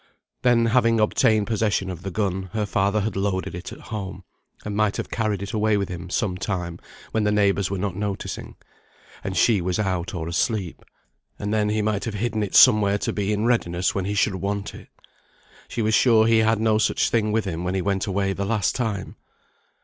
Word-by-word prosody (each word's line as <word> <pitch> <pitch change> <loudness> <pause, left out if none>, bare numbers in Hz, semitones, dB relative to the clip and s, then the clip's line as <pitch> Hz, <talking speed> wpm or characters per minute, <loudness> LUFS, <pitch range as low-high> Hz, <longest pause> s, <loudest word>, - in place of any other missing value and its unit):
Then 120 -2 +4
having 115 -1 +3
obtained 110 0 +3
possession 105 -4 0
of 85 - -8
the 95 - -5
gun, 95 -2 -2
her 110 -1 0
father 100 +1 +1
had 105 0 -2
loaded 95 -1 -1
it 90 +1 -7
at - - -10
home, 95 -4 -6 0.4
and 105 -1 -3
might 105 -1 +1
have - - -5
carried 105 -3 -1
it 100 - -6
away 110 -1 +2
with 100 -1 -2
him 85 -1 -7
some 95 -2 -1
time 90 -4 -3 0.3
when 110 - 0
the 105 - +2
neighbours 100 -2 +2
were 100 - -2
not 95 -1 -2
noticing, 100 0 -4 0.7
and 95 -1 -3
she 105 +1 +4
was 90 +1 -1
out, 95 -1 -2
or 80 -2 -4
asleep; 95 +1 -2 0.5
and 105 +1 -3
then 105 -1 +1
he 105 0 0
might 105 -2 -1
have 110 -3 -4
hidden 110 +1 -1
it 105 - -3
somewhere 100 -1 +6
to - - -2
be 100 0 -1
in 105 +1 0
readiness 90 -7 +1
when 95 -2 -2
he 100 +1 -2
should 100 0 +2
want 100 +1 -3
it. - - -12 0.8
She 115 - -3
was 110 +1 +1
sure 110 -2 +5
he 115 0 +4
had 110 0 +2
no 110 -1 +2
such - - +1
thing 110 -2 +1
with 110 0 0
him 85 -2 -3
when 90 +1 -2
he 95 - 0
went 100 +1 -1
away 100 0 0
the 100 - -3
last 100 -2 0
time. 110 -6 -3
100 Hz, 210 wpm, -23 LUFS, 95-110 Hz, 0.8 s, somewhere